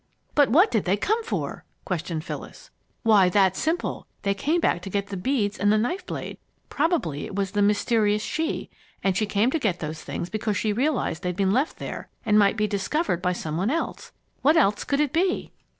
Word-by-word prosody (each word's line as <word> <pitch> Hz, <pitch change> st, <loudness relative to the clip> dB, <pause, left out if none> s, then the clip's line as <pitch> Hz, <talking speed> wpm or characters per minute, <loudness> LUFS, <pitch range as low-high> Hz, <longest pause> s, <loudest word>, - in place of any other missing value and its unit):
"But 290 Hz, -3 st, +4 dB
what 345 Hz, -, +5 dB
did 220 Hz, -, +1 dB
they 190 Hz, +2 st, +2 dB
come 440 Hz, -, 0 dB
for?" 455 Hz, -, -3 dB, 0.2 s
questioned 170 Hz, -5 st, -3 dB
Phyllis. -, -, -8 dB, 0.3 s
"Why, 205 Hz, -5 st, +5 dB
that's 190 Hz, 0 st, +3 dB
simple. 325 Hz, +2 st, -2 dB, 0.2 s
They 200 Hz, -, +2 dB
came 300 Hz, -, 0 dB
back 175 Hz, -, +1 dB
to 195 Hz, -, -7 dB
get 200 Hz, +1 st, -2 dB
the 200 Hz, -, -4 dB
beads 210 Hz, 0 st, -1 dB
and 205 Hz, 0 st, +3 dB
the 215 Hz, -, +4 dB
knife 350 Hz, -, -1 dB
blade. -, -, -5 dB, 0.3 s
Probably 285 Hz, -, 0 dB
it -, -, -8 dB
was 195 Hz, -2 st, -1 dB
the 205 Hz, 0 st, 0 dB
'mysterious 210 Hz, +1 st, +2 dB
she,' 320 Hz, +1 st, -2 dB, 0.3 s
and 195 Hz, -1 st, +2 dB
she 215 Hz, +2 st, +1 dB
came 210 Hz, +4 st, +2 dB
to 325 Hz, -, 0 dB
get 210 Hz, -, 0 dB
those 155 Hz, 0 st, -5 dB
things 170 Hz, -, -5 dB
because 215 Hz, -1 st, -1 dB
she 215 Hz, +1 st, 0 dB
realized 250 Hz, -, 0 dB
they'd 180 Hz, -1 st, -2 dB
been 195 Hz, +1 st, +2 dB
left 270 Hz, +7 st, 0 dB
there -, -, -6 dB, 0.2 s
and 210 Hz, -2 st, +4 dB
might 200 Hz, +1 st, +4 dB
be 210 Hz, -, +2 dB
discovered 205 Hz, -, -1 dB
by 180 Hz, 0 st, +1 dB
some 155 Hz, -3 st, -4 dB
one 190 Hz, +6 st, +1 dB
else. 330 Hz, +5 st, -3 dB, 0.3 s
What 305 Hz, +4 st, +4 dB
else 210 Hz, -9 st, +3 dB
could 280 Hz, +1 st, +1 dB
it 295 Hz, -2 st, 0 dB
be?" 365 Hz, +3 st, 0 dB
210 Hz, 210 wpm, -25 LUFS, 190-285 Hz, 0.3 s, what